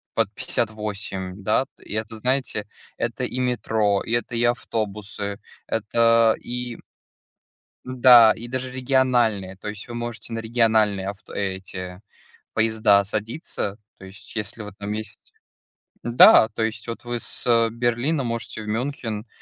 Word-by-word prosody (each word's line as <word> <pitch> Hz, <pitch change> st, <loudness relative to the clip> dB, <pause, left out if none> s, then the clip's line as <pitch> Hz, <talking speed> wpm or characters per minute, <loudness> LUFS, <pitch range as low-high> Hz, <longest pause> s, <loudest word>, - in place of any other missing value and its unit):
под -, -, +1 dB
58, 100 Hz, -3 st, -3 dB
да, 110 Hz, +6 st, +2 dB
и -, -, -8 dB
это, 110 Hz, +1 st, -3 dB
знаете, 125 Hz, -3 st, -1 dB, 0.3 s
это 120 Hz, +1 st, -3 dB
и 125 Hz, -, -4 dB
метро, 110 Hz, -5 st, +1 dB
и -, -, -6 dB
это 120 Hz, 0 st, -1 dB
и 115 Hz, -, +1 dB
автобусы, 105 Hz, -3 st, -2 dB, 0.3 s
это 115 Hz, +1 st, +3 dB
и 125 Hz, -1 st, -5 dB, 1.1 s
Да, 125 Hz, -3 st, +7 dB
и 115 Hz, -, -6 dB
даже 130 Hz, +1 st, -3 dB
региональные, 125 Hz, -7 st, +1 dB
то 95 Hz, -, -8 dB
есть 105 Hz, +1 st, -7 dB
вы 120 Hz, -, -7 dB
можете 120 Hz, -1 st, -6 dB
на 115 Hz, -, -2 dB
региональные 110 Hz, -4 st, +2 dB
авто 100 Hz, 0 st, -8 dB
эти 95 Hz, -2 st, -4 dB, 0.5 s
поезда 110 Hz, -2 st, +3 dB
садиться. 105 Hz, -, -4 dB, 0.2 s
То 95 Hz, -, -11 dB
есть, 95 Hz, +4 st, -13 dB
если 110 Hz, +1 st, -4 dB
вы 105 Hz, -, -8 dB
там 100 Hz, 0 st, -4 dB
есть, 110 Hz, 0 st, -6 dB, 0.7 s
да, 120 Hz, -1 st, +7 dB
то 115 Hz, -, 0 dB
есть 110 Hz, +1 st, -3 dB
вот 115 Hz, -, -6 dB
вы 120 Hz, 0 st, -3 dB
с -, -, -3 dB, 0.2 s
Берлина 120 Hz, +6 st, 0 dB
можете 115 Hz, -2 st, -4 dB
в -, -, -9 dB
Мюнхен 115 Hz, -1 st, -3 dB
110 Hz, 140 wpm, -23 LUFS, 105-120 Hz, 1.1 s, Да